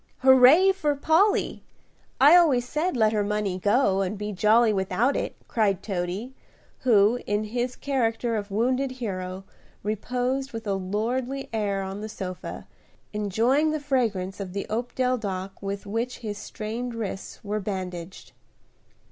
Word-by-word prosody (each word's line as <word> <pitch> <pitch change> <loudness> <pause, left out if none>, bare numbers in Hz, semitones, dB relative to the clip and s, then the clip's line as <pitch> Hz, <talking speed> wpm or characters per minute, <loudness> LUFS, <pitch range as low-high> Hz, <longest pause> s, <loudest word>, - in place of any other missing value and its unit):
"Hooray 265 +9 +7
for 300 -7 0
Polly! 325 +8 +2 0.6
I 290 +5 +8
always 280 -9 +4
said 310 +2 -1
let 220 -1 +3
her 210 -1 +1
money 205 -2 -1
go 205 -1 +2
and 195 +2 -2
be 210 +1 -4
jolly 215 +3 +4
without 195 +7 +1
it," - - -2
cried 205 -5 +1
Toady, 195 +5 -3 0.5
who, 225 -1 +4
in 205 +1 0
his 245 +3 -2
character 235 -4 -1
of 205 -1 -3
wounded 255 +6 0
hero, 190 -6 -5 0.4
reposed 250 +6 -2
with 225 0 -6
a 200 - 0
lordly 235 +8 -2
air 200 -3 -1
on 195 +2 -5
the 215 - -5
sofa, 185 -3 -6 0.5
enjoying 225 +9 +2
the 310 0 -1
fragrance 225 -10 -1
of 190 -2 -6
the 200 - -3
opodeldoc 225 -5 -1
with 200 0 -4
which 230 +5 -3
his 205 -1 -4
strained 230 +3 -5
wrists 200 -4 -5
were 210 +1 -2
bandaged. 185 -3 -6
220 Hz, 140 wpm, -26 LUFS, 200-255 Hz, 0.6 s, I